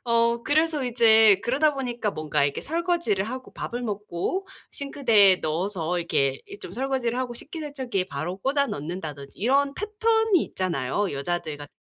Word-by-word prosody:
어 235 Hz, 0 st, +2 dB
그래서 310 Hz, -1 st, +1 dB
이제 225 Hz, -4 st, +6 dB
그러다 285 Hz, +4 st, +2 dB
보니까 240 Hz, -5 st, -2 dB
뭔가 155 Hz, -3 st, -1 dB
이렇게 140 Hz, 0 st, -1 dB
설거지를 335 Hz, -, 0 dB
하고 255 Hz, +2 st, -7 dB
밥을 240 Hz, +1 st, -5 dB
먹고 210 Hz, -, -3 dB, 0.3 s
싱크대에 230 Hz, -9 st, +4 dB
넣어서 175 Hz, +1 st, -2 dB
이렇게 135 Hz, -5 st, 0 dB
이 405 Hz, 0 st, -10 dB
쫌 175 Hz, -, -9 dB
설거지를 255 Hz, 0 st, -1 dB
하고 245 Hz, -2 st, -3 dB
식기세척기에 270 Hz, -, -4 dB
바로 165 Hz, +7 st, -4 dB
꽂아 280 Hz, +5 st, +1 dB
넣는다든지 150 Hz, -, -6 dB
이런 275 Hz, +6 st, +2 dB
패턴이 435 Hz, -2 st, +2 dB
있잖아요. 180 Hz, +1 st, -2 dB
여자들 155 Hz, +1 st, -3 dB
같 145 Hz, 0 st, -9 dB
235 Hz, 370 characters per minute, -25 LUFS, 175-280 Hz, 0.3 s, 이제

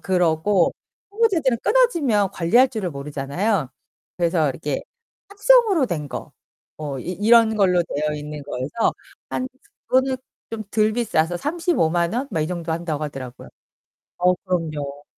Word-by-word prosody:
그러고 180 Hz, 0 st, +2 dB, 0.4 s
초보자들은 360 Hz, -, +2 dB
끊어지면 285 Hz, -, +3 dB
관리할 235 Hz, +11 st, +4 dB
줄을 215 Hz, -7 st, -3 dB
모르잖아요. 145 Hz, -, -2 dB, 0.5 s
그래서 170 Hz, -3 st, +2 dB
이렇게 145 Hz, 0 st, -3 dB, 0.5 s
합성으로 410 Hz, -, +4 dB
된 155 Hz, -, -3 dB
거. -, -, -7 dB, 0.5 s
뭐 145 Hz, -3 st, -4 dB
이 130 Hz, -, -5 dB
이런 220 Hz, +3 st, +4 dB
걸로 180 Hz, -4 st, +3 dB
되어 150 Hz, -2 st, -2 dB
있는 150 Hz, 0 st, -6 dB
거여서 145 Hz, -, -1 dB, 0.3 s
한 255 Hz, -, -2 dB, 0.4 s
그거는 260 Hz, 0 st, +2 dB, 0.3 s
좀 220 Hz, -1 st, -5 dB
덜 215 Hz, 0 st, +2 dB
비싸서 175 Hz, -8 st, +1 dB
350,000 175 Hz, -, 0 dB
원? 260 Hz, +3 st, -2 dB
막 165 Hz, -7 st, -1 dB
이 155 Hz, -, 0 dB
정도 170 Hz, -1 st, -3 dB
한다고 160 Hz, -3 st, -3 dB
하더라고요. 130 Hz, -4 st, -8 dB, 0.7 s
어 180 Hz, +1 st, +4 dB
그럼요. 150 Hz, -6 st, -3 dB
180 Hz, 290 characters per minute, -22 LUFS, 155-235 Hz, 0.7 s, 관리할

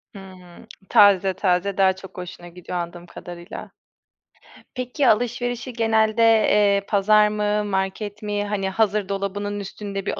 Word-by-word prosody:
Hımm, 185 Hz, +1 st, -13 dB, 0.2 s
taze 195 Hz, -2 st, +5 dB
taze 185 Hz, +1 st, 0 dB
daha 190 Hz, -1 st, +4 dB
çok 190 Hz, 0 st, -13 dB
hoşuna 175 Hz, -1 st, -8 dB
gidiyor 180 Hz, +1 st, -7 dB
anladığım 175 Hz, 0 st, -6 dB
kadarıyla. 175 Hz, 0 st, -10 dB, 1.0 s
Peki, 255 Hz, +2 st, -1 dB
alışverişi 245 Hz, +2 st, 0 dB
genelde, 225 Hz, -1 st, +2 dB
eee, 210 Hz, -3 st, +4 dB
pazar 210 Hz, +1 st, +4 dB
mı, 210 Hz, 0 st, -1 dB
market 200 Hz, +2 st, -3 dB
mi? 205 Hz, 0 st, -2 dB
Hani, 200 Hz, -2 st, -2 dB
hazır 205 Hz, 0 st, 0 dB
dolabının 205 Hz, +1 st, -3 dB
üstünde 200 Hz, 0 st, -6 dB
bir -, -, -3 dB
205 Hz, 130 wpm, -22 LUFS, 190-215 Hz, 1.0 s, taze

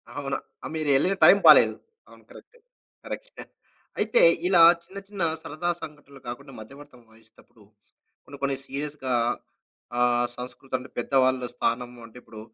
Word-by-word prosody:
ఆవునా! 135 Hz, -1 st, -3 dB, 0.3 s
ఆహ్, -, -, -6 dB
మీరెళ్ళిన 155 Hz, +4 st, +1 dB
టైం 200 Hz, -, +8 dB
బాలేదు. -, -, +7 dB, 0.3 s
అవును -, -, -18 dB
కరెక్టే. 485 Hz, -, -17 dB, 0.5 s
కరెక్స్టే. -, -, -8 dB, 0.6 s
అయితే 485 Hz, -, +2 dB, 0.3 s
ఇలా 180 Hz, -2 st, +5 dB, 0.2 s
చిన్న, 195 Hz, -, -13 dB
చిన్న 200 Hz, -3 st, -4 dB, 0.2 s
సరదా 160 Hz, +4 st, -4 dB
సంఘటనలు 145 Hz, -3 st, -12 dB
గాకుండా, 135 Hz, +3 st, -8 dB
మధ్యవర్తం 135 Hz, +3 st, -14 dB
వహిస్తప్పుడు 110 Hz, 0 st, -23 dB, 0.6 s
కొన్ని, 140 Hz, 0 st, -12 dB
కొన్ని 140 Hz, -1 st, 0 dB
సీరియస్‌గా 140 Hz, -2 st, -4 dB, 0.8 s
ఆహ్, 120 Hz, 0 st, +2 dB
సంస్కృతంటే, 130 Hz, +1 st, -6 dB
పెద్దవాళ్ళు 130 Hz, -2 st, +1 dB
స్థానము 120 Hz, 0 st, -3 dB
అంటే 115 Hz, +2 st, -15 dB
ఇప్పుడూ 110 Hz, -, -12 dB
135 Hz, 125 wpm, -25 LUFS, 125-150 Hz, 0.8 s, టైం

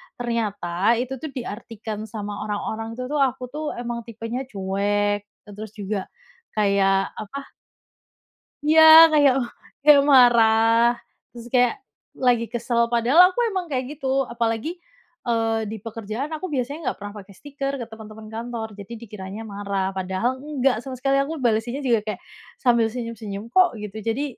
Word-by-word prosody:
ternyata 215 Hz, -4 st, 0 dB
itu 255 Hz, +1 st, -4 dB
tuh 315 Hz, -, -5 dB
diartikan 220 Hz, -3 st, -6 dB
sama 205 Hz, -1 st, -6 dB
orang-orang 220 Hz, +2 st, -3 dB
itu 255 Hz, -, -5 dB
tuh, 300 Hz, -, 0 dB
aku 255 Hz, 0 st, -7 dB
tuh 305 Hz, +1 st, -5 dB
emang 240 Hz, 0 st, -4 dB
tipenya 230 Hz, +2 st, -5 dB
cuek, 205 Hz, +1 st, 0 dB, 0.3 s
e -, -, -13 dB
terus 215 Hz, +1 st, -9 dB
juga 200 Hz, -2 st, -4 dB, 0.5 s
kayak 195 Hz, -2 st, +2 dB
apa? 275 Hz, +6 st, -8 dB, 1.1 s
Iya, 310 Hz, +2 st, +5 dB, 0.3 s
kayak, 290 Hz, -3 st, +5 dB
oh 240 Hz, -, -3 dB, 0.4 s
kayak 290 Hz, -1 st, +8 dB
marah, 230 Hz, -2 st, +5 dB, 0.4 s
terus 235 Hz, 0 st, -9 dB
kayak 245 Hz, -1 st, +4 dB, 0.4 s
lagi 245 Hz, -3 st, +2 dB
kesel, 235 Hz, 0 st, 0 dB
padahal 240 Hz, +7 st, +3 dB
aku -, -, -3 dB
emang 375 Hz, -2 st, -2 dB
kayak 260 Hz, -4 st, -2 dB
gitu, 270 Hz, -1 st, 0 dB
apalagi, 235 Hz, +8 st, -2 dB, 0.5 s
eee, 225 Hz, -1 st, 0 dB
di 220 Hz, +2 st, -5 dB
pekerjaan 230 Hz, +6 st, -5 dB
aku 315 Hz, +4 st, -4 dB
biasanya 280 Hz, 0 st, -3 dB
nggak -, -, -12 dB
pernah 205 Hz, 0 st, -7 dB
pake 200 Hz, 0 st, -14 dB
stiker 275 Hz, +3 st, -5 dB
ke -, -, -4 dB
teman-teman 215 Hz, 0 st, -11 dB
kantor, 230 Hz, 0 st, -5 dB
jadi 200 Hz, +4 st, -9 dB
dikiranya 205 Hz, -1 st, -8 dB
marah. 200 Hz, -2 st, -3 dB
Padahal 190 Hz, +7 st, -2 dB
nggak 275 Hz, -2 st, 0 dB
sama 260 Hz, +2 st, -7 dB
sekali, 275 Hz, +2 st, +1 dB
aku 275 Hz, +3 st, -1 dB
balesinnya 240 Hz, +4 st, 0 dB
juga 240 Hz, -4 st, +3 dB
kayak, 210 Hz, -3 st, -4 dB, 0.4 s
sambil 235 Hz, -2 st, +4 dB
senyum-senyum 225 Hz, -2 st, -6 dB
kok, 365 Hz, -5 st, +4 dB
gitu. 210 Hz, 0 st, -7 dB
Jadi, 240 Hz, +6 st, 0 dB
230 Hz, 150 wpm, -23 LUFS, 210-255 Hz, 1.1 s, kayak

